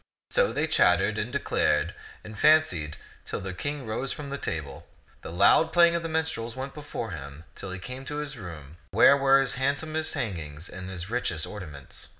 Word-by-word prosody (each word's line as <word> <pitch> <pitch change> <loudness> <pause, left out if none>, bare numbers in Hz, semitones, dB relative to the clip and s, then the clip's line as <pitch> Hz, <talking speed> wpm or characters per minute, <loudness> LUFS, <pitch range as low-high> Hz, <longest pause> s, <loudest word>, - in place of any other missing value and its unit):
So - - +3
they - - 0
chattered 95 +5 +3
and 115 +4 -3
declared 85 - +1 0.3
and 110 - -9
fancied 105 - +3 0.3
till - - -4
the 95 -1 -5
King 145 +7 -4
rose 115 +5 -2
from 145 -2 -6
the 140 - -2
table. 70 -4 -5 0.3
The - - -7
loud 160 - +5
playing 170 0 +6
of 170 - 0
the 165 - -4
minstrels 160 -8 -2
went 135 +1 -5
before 145 -7 -5
him 70 -1 -8
till 95 - -8
he 95 - -4
came 125 +7 -7
to 145 - -5
his 150 -2 -4
room 85 - -9
where - - +7
were 135 -1 +5
his 135 -2 +1
handsomest 155 +3 0
hangings 80 -7 -4
and 95 0 -7
his 95 +1 -6
richest 85 -10 -1
ornaments. 90 -8 -8
110 Hz, 185 wpm, -27 LUFS, 85-140 Hz, 0.3 s, where